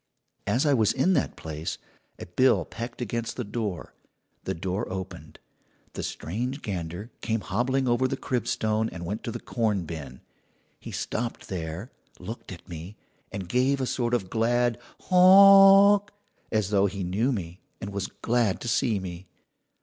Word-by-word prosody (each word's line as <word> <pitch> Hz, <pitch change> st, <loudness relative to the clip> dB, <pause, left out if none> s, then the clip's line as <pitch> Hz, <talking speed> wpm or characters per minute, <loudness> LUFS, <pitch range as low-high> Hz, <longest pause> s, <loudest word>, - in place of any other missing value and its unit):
"As 120 Hz, +8 st, +2 dB
I 145 Hz, -, +4 dB
was 110 Hz, -5 st, +3 dB
in 190 Hz, -, +2 dB
that -, -, 0 dB
place, 80 Hz, 0 st, -5 dB, 0.4 s
a -, -, -8 dB
bill 110 Hz, +9 st, +3 dB
pecked 120 Hz, +1 st, -6 dB
against 115 Hz, 0 st, -3 dB
the 125 Hz, -, -3 dB
door. 105 Hz, -5 st, -4 dB, 0.5 s
The -, -, -2 dB
door 95 Hz, +5 st, -3 dB
opened. 90 Hz, -4 st, -7 dB, 0.6 s
The -, -, -5 dB
strange 125 Hz, -, -4 dB
gander 90 Hz, +3 st, -5 dB
came 110 Hz, -2 st, -1 dB
hobbling 130 Hz, +7 st, 0 dB
over 120 Hz, +2 st, +2 dB
the -, -, -3 dB
crib 125 Hz, -2 st, -2 dB
stone 110 Hz, -2 st, 0 dB
and 85 Hz, -1 st, -7 dB
went 105 Hz, +6 st, -4 dB
to 115 Hz, -, -3 dB
the 120 Hz, -, -5 dB
corn 105 Hz, -8 st, -1 dB
bin. 70 Hz, -6 st, -8 dB, 0.6 s
He -, -, -9 dB
stopped 115 Hz, +1 st, -4 dB
there, 90 Hz, -, -5 dB, 0.3 s
looked 105 Hz, +5 st, -8 dB
at 85 Hz, -2 st, -10 dB
me, 85 Hz, +5 st, -8 dB, 0.3 s
and 95 Hz, -3 st, -5 dB
gave 130 Hz, +7 st, +2 dB
a 130 Hz, -, 0 dB
sort 120 Hz, -1 st, 0 dB
of 95 Hz, -6 st, -3 dB
glad 120 Hz, 0 st, +1 dB, 0.2 s
'Honk' 195 Hz, +2 st, +8 dB, 0.4 s
as 110 Hz, -2 st, 0 dB
though 100 Hz, -1 st, +4 dB
he 100 Hz, 0 st, -4 dB
knew 105 Hz, +9 st, 0 dB
me 90 Hz, -6 st, -5 dB, 0.2 s
and 100 Hz, -, -6 dB
was 100 Hz, -1 st, -3 dB
glad 110 Hz, 0 st, 0 dB
to -, -, -5 dB
see 110 Hz, -1 st, +1 dB
me. 90 Hz, -1 st, -7 dB
110 Hz, 165 wpm, -26 LUFS, 95-125 Hz, 0.6 s, Honk